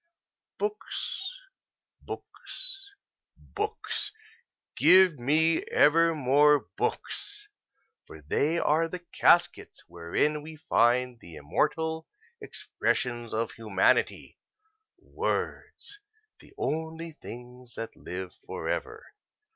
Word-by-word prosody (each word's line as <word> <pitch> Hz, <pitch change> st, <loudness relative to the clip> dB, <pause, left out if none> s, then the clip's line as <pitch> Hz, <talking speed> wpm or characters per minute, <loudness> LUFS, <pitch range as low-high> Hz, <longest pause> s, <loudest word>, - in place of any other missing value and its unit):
Books, 415 Hz, -1 st, -3 dB, 0.7 s
books, 400 Hz, -5 st, -8 dB, 0.5 s
books 425 Hz, +1 st, -4 dB, 0.6 s
give 185 Hz, -6 st, +6 dB
me 160 Hz, +6 st, +3 dB
ever 165 Hz, +3 st, +4 dB
more 145 Hz, +1 st, +4 dB
books, 415 Hz, -1 st, -3 dB, 0.6 s
for -, -, -11 dB
they 160 Hz, +4 st, +1 dB
are 165 Hz, 0 st, +2 dB
the 180 Hz, +1 st, -7 dB
caskets 175 Hz, +1 st, +3 dB
wherein 90 Hz, -, 0 dB
we 155 Hz, +1 st, -9 dB
find 125 Hz, -5 st, +2 dB
the 85 Hz, -5 st, -12 dB
immortal 160 Hz, -, -1 dB, 0.3 s
expressions 120 Hz, -, -2 dB
of 110 Hz, +1 st, -1 dB
humanity 105 Hz, -4 st, +1 dB, 0.6 s
words, 410 Hz, 0 st, -3 dB, 0.4 s
the -, -, -18 dB
only 160 Hz, -, -3 dB
things 125 Hz, -3 st, -11 dB
that 115 Hz, -, -6 dB
live 90 Hz, 0 st, -6 dB
forever! -, -, -3 dB
155 Hz, 85 wpm, -28 LUFS, 120-170 Hz, 0.7 s, give